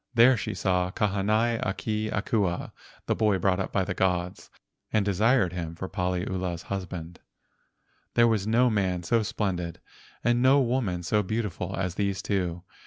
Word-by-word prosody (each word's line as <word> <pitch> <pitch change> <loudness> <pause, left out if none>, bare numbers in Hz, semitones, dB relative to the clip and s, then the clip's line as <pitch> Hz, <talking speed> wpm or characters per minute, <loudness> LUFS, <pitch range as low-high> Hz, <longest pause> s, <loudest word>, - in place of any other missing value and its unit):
There 120 +3 +7
she 110 - -4
saw 90 -2 +1
Kahanai 105 +4 +1
a 95 - 0
ke 110 +2 -2
Akua 100 -4 -1 0.3
(the - - +1
boy 105 -3 +2
brought 95 0 +1
up 95 - -3
by 95 - +1
the - - -3
gods) 90 -1 -1 0.4
and 110 -2 +2
desired 100 0 +2
him 85 -2 -4
for 95 - -5
Paliula's 90 -1 -2
husband. 90 -3 -6 1.0
There 120 0 +6
was 110 -3 +1
no 120 +2 +4
man 95 -4 0
so 115 +7 +2
splendid 90 -5 -2 0.4
and 120 0 +2
no 130 +2 +6
woman 115 -9 0
so 105 +5 +2
beautiful 100 -3 -3
as 90 -2 -2
these 100 0 -1
two. 90 -4 -1
95 Hz, 160 wpm, -27 LUFS, 90-110 Hz, 1.0 s, There